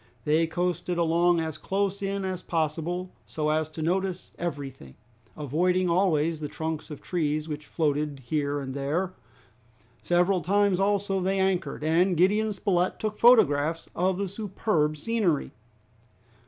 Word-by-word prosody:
They 160 Hz, +2 st, +3 dB
coasted 175 Hz, +1 st, -2 dB
along 170 Hz, +1 st, +3 dB
as 160 Hz, -1 st, -4 dB
close 200 Hz, 0 st, -1 dB
in 195 Hz, 0 st, -2 dB
as 185 Hz, -1 st, -3 dB
possible, 170 Hz, +3 st, -2 dB, 0.2 s
so 155 Hz, -1 st, -1 dB
as 155 Hz, 0 st, 0 dB
to 155 Hz, 0 st, -6 dB
notice 185 Hz, +2 st, -1 dB
everything, 140 Hz, -, -5 dB, 0.4 s
avoiding 175 Hz, +5 st, +1 dB
always 165 Hz, -3 st, +2 dB
the 150 Hz, -, -4 dB
trunks 160 Hz, +1 st, -4 dB
of 150 Hz, -, -9 dB
trees 155 Hz, -3 st, -1 dB
which 150 Hz, -1 st, -6 dB
floated 150 Hz, -3 st, -1 dB
here 145 Hz, +1 st, -1 dB
and 130 Hz, -1 st, -5 dB
there. 155 Hz, +7 st, -1 dB, 0.9 s
Several 175 Hz, +1 st, +2 dB
times 200 Hz, 0 st, +2 dB
also 195 Hz, -1 st, +1 dB
they 190 Hz, +1 st, 0 dB
anchored, 190 Hz, -4 st, 0 dB
and 170 Hz, +3 st, +2 dB
Gideon 210 Hz, +5 st, +3 dB
Spilett 185 Hz, -3 st, 0 dB
took 215 Hz, -1 st, -2 dB
photographs 165 Hz, -, +4 dB
of 185 Hz, +1 st, +1 dB
the 200 Hz, 0 st, -1 dB
superb 190 Hz, -6 st, -1 dB
scenery. 190 Hz, -4 st, 0 dB
175 Hz, 140 wpm, -27 LUFS, 155-190 Hz, 0.9 s, photographs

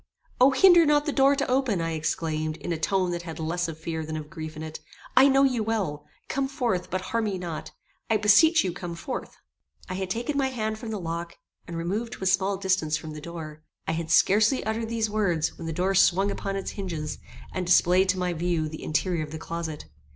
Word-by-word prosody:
"O! 255 Hz, +2 st, +7 dB
hinder 345 Hz, +5 st, +7 dB
not 295 Hz, -1 st, +3 dB
the 295 Hz, -, 0 dB
door 275 Hz, 0 st, +4 dB
to 280 Hz, 0 st, -1 dB
open," 255 Hz, -6 st, +1 dB
I 165 Hz, 0 st, -1 dB
exclaimed, 155 Hz, 0 st, -2 dB
in 175 Hz, -, -3 dB
a 160 Hz, -, -4 dB
tone 185 Hz, +2 st, +1 dB
that 175 Hz, 0 st, -3 dB
had 165 Hz, -3 st, -7 dB
less 170 Hz, +2 st, -1 dB
of 160 Hz, -2 st, -6 dB
fear 160 Hz, 0 st, -4 dB
than 155 Hz, 0 st, -4 dB
of 155 Hz, 0 st, -8 dB
grief 155 Hz, -3 st, -7 dB
in 155 Hz, -, -6 dB
it. 155 Hz, 0 st, -7 dB, 0.4 s
"I 265 Hz, +2 st, +8 dB
know 270 Hz, 0 st, +4 dB
you 255 Hz, -4 st, +2 dB
well. 195 Hz, -10 st, -2 dB, 0.2 s
Come 275 Hz, 0 st, -1 dB
forth, 240 Hz, -9 st, -1 dB
but 185 Hz, +1 st, -2 dB
harm 230 Hz, -1 st, +1 dB
me 200 Hz, -3 st, -1 dB
not. 170 Hz, -3 st, -5 dB, 0.4 s
I 220 Hz, -, +4 dB
beseech 215 Hz, +11 st, +5 dB
you 185 Hz, -, -1 dB
come 175 Hz, -1 st, -6 dB
forth." 255 Hz, +10 st, -6 dB, 0.5 s
I 185 Hz, -, -4 dB
had 190 Hz, 0 st, -3 dB
taken 235 Hz, +8 st, -2 dB
my 270 Hz, -, +2 dB
hand 220 Hz, -4 st, -3 dB
from 230 Hz, -, -6 dB
the 215 Hz, -2 st, -3 dB
lock, 170 Hz, 0 st, -5 dB, 0.3 s
and 170 Hz, -, -5 dB
removed 205 Hz, +8 st, -2 dB
to -, -, -8 dB
a -, -, -2 dB
small 190 Hz, +1 st, +2 dB
distance 185 Hz, -5 st, +1 dB
from 155 Hz, 0 st, -8 dB
the 150 Hz, 0 st, -8 dB
door. 155 Hz, -2 st, -8 dB, 0.3 s
I -, -, +1 dB
had 160 Hz, 0 st, -3 dB
scarcely 210 Hz, +9 st, +4 dB
uttered 220 Hz, +1 st, -2 dB
these 225 Hz, -1 st, 0 dB
words, 180 Hz, -7 st, 0 dB
when 165 Hz, -, -7 dB
the -, -, -2 dB
door 185 Hz, +4 st, 0 dB
swung 195 Hz, +1 st, +4 dB
upon 195 Hz, 0 st, -3 dB
its 195 Hz, -, -3 dB
hinges, 170 Hz, -7 st, -5 dB, 0.3 s
and 185 Hz, -, -2 dB
displayed 185 Hz, +1 st, +4 dB
to 185 Hz, -, +2 dB
my 180 Hz, -1 st, -1 dB
view 170 Hz, -1 st, -1 dB
the 155 Hz, 0 st, -8 dB
interior 155 Hz, +2 st, 0 dB
of 150 Hz, -, -7 dB
the 160 Hz, -, -5 dB
closet. 165 Hz, -1 st, -5 dB
185 Hz, 230 wpm, -26 LUFS, 165-220 Hz, 0.5 s, I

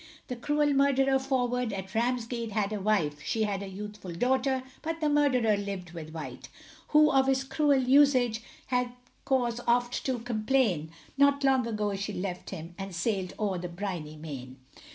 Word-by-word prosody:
The 250 Hz, -, -2 dB
cruel 295 Hz, +4 st, +1 dB
murderer 270 Hz, -1 st, +3 dB
Forward, 250 Hz, -3 st, 0 dB
at 190 Hz, -1 st, -6 dB
Ramsgate 235 Hz, -1 st, -1 dB
had 210 Hz, -1 st, 0 dB
a 210 Hz, -, -3 dB
wife, 165 Hz, -8 st, +1 dB
She 220 Hz, -, 0 dB
had 200 Hz, -2 st, -1 dB
a 200 Hz, -, -5 dB
youthful 200 Hz, -1 st, -7 dB
daughter; 260 Hz, +6 st, +1 dB, 0.2 s
but 325 Hz, 0 st, -3 dB
the 305 Hz, -2 st, +1 dB
murderer 255 Hz, -7 st, +3 dB
lived 200 Hz, -4 st, -5 dB
with 165 Hz, -2 st, -8 dB
White, 160 Hz, -1 st, -8 dB, 0.4 s
Who 305 Hz, 0 st, +5 dB
of 270 Hz, -1 st, +4 dB
his 265 Hz, 0 st, +2 dB
cruel 285 Hz, +1 st, +2 dB
usage, 255 Hz, -3 st, +4 dB, 0.2 s
had 250 Hz, -1 st, 0 dB, 0.3 s
cause 245 Hz, -3 st, +1 dB
oft 240 Hz, +1 st, +1 dB
to 260 Hz, -2 st, 0 dB
complain, 225 Hz, -, 0 dB, 0.3 s
Not 280 Hz, 0 st, +4 dB
long 265 Hz, -3 st, +3 dB
ago 210 Hz, -3 st, -1 dB
she 200 Hz, +1 st, -4 dB
left 180 Hz, -1 st, -4 dB
him, 165 Hz, +2 st, -7 dB
and 195 Hz, -2 st, -5 dB
sailed 190 Hz, 0 st, -1 dB
o'er 200 Hz, -4 st, -1 dB
the 180 Hz, 0 st, -5 dB
briny 170 Hz, -4 st, -5 dB
main. 135 Hz, -5 st, -8 dB
230 Hz, 170 wpm, -29 LUFS, 195-265 Hz, 0.4 s, Who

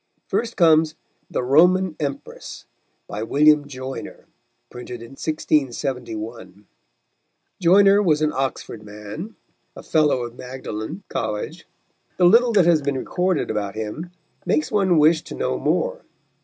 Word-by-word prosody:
First 235 Hz, 0 st, -2 dB
comes 160 Hz, -2 st, +4 dB, 0.3 s
The -, -, -2 dB
Roman 175 Hz, +6 st, +4 dB
Empress, 140 Hz, -3 st, -6 dB, 0.4 s
by 105 Hz, -, -5 dB
William 150 Hz, +4 st, +4 dB
Joyner, 130 Hz, -1 st, -8 dB, 0.5 s
printed 125 Hz, 0 st, -8 dB
in 115 Hz, 0 st, -11 dB
1671. 120 Hz, -, -3 dB, 0.9 s
Joyner 195 Hz, +3 st, +5 dB
was 155 Hz, -6 st, +2 dB
an 155 Hz, -, +1 dB
Oxford 130 Hz, -4 st, -3 dB
man, 105 Hz, -, -9 dB, 0.4 s
a -, -, -10 dB
fellow 150 Hz, -5 st, +2 dB
of 120 Hz, 0 st, -7 dB
Magdalen 125 Hz, -, -7 dB
College. 105 Hz, -1 st, -4 dB, 0.5 s
The 180 Hz, -, +4 dB
little 235 Hz, +6 st, +6 dB
that 195 Hz, -5 st, +5 dB
has 170 Hz, -3 st, +4 dB
been 140 Hz, -1 st, -1 dB
recorded 180 Hz, +4 st, -1 dB
about 100 Hz, -2 st, -3 dB
him 110 Hz, +11 st, -5 dB, 0.3 s
makes 155 Hz, +1 st, 0 dB
one 190 Hz, -5 st, +3 dB
wish 155 Hz, +1 st, +5 dB
to -, -, -8 dB
know -, -, -2 dB
more. -, -, 0 dB
150 Hz, 130 wpm, -22 LUFS, 120-175 Hz, 0.9 s, little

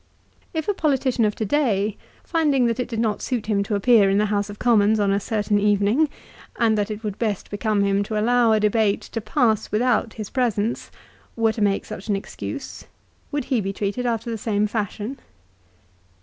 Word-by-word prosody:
If 320 Hz, -2 st, -3 dB
a 410 Hz, -, +2 dB
politician 265 Hz, -, +1 dB
of 210 Hz, -, 0 dB
to 220 Hz, -, -2 dB
day, 215 Hz, -6 st, +1 dB, 0.3 s
finding 295 Hz, -6 st, +2 dB
that 235 Hz, +1 st, 0 dB
it 250 Hz, -, -1 dB
did 230 Hz, -, -5 dB
not 220 Hz, -3 st, 0 dB
suit 245 Hz, -5 st, -2 dB
him 210 Hz, -2 st, +1 dB
to 205 Hz, +1 st, -1 dB
appear 205 Hz, -1 st, +5 dB
in 195 Hz, -, +2 dB
the 210 Hz, -, +3 dB
House 205 Hz, 0 st, 0 dB
of 205 Hz, -, -8 dB
Commons 220 Hz, -2 st, +3 dB
on 200 Hz, -1 st, +2 dB
a 200 Hz, -, +2 dB
certain 210 Hz, 0 st, 0 dB
evening, 205 Hz, +8 st, +2 dB, 0.5 s
and 225 Hz, -2 st, +2 dB
that 205 Hz, -1 st, -1 dB
it 215 Hz, +1 st, -6 dB
would 205 Hz, -2 st, -4 dB
best 215 Hz, -5 st, -2 dB
become 205 Hz, 0 st, 0 dB
him 200 Hz, 0 st, +2 dB
to 215 Hz, 0 st, -2 dB
allow 240 Hz, +1 st, +3 dB
a 215 Hz, -, +4 dB
debate 210 Hz, -1 st, +2 dB
to 225 Hz, -, -6 dB
pass 225 Hz, -3 st, +1 dB
without 225 Hz, 0 st, +1 dB
his 215 Hz, -3 st, -7 dB
presence, 235 Hz, -3 st, -1 dB, 0.5 s
were 225 Hz, -1 st, +2 dB
to 220 Hz, -, -5 dB
make 200 Hz, -1 st, +1 dB
such 195 Hz, -, -8 dB
an 205 Hz, -, +1 dB
excuse, 195 Hz, -, -7 dB, 0.5 s
would 290 Hz, -2 st, -1 dB
he 250 Hz, -5 st, 0 dB
be 195 Hz, 0 st, -2 dB
treated 205 Hz, +5 st, -2 dB
after 230 Hz, 0 st, -2 dB
the 225 Hz, -, -4 dB
same 210 Hz, -1 st, 0 dB
fashion 210 Hz, +4 st, -3 dB
215 Hz, 200 wpm, -23 LUFS, 205-240 Hz, 0.5 s, appear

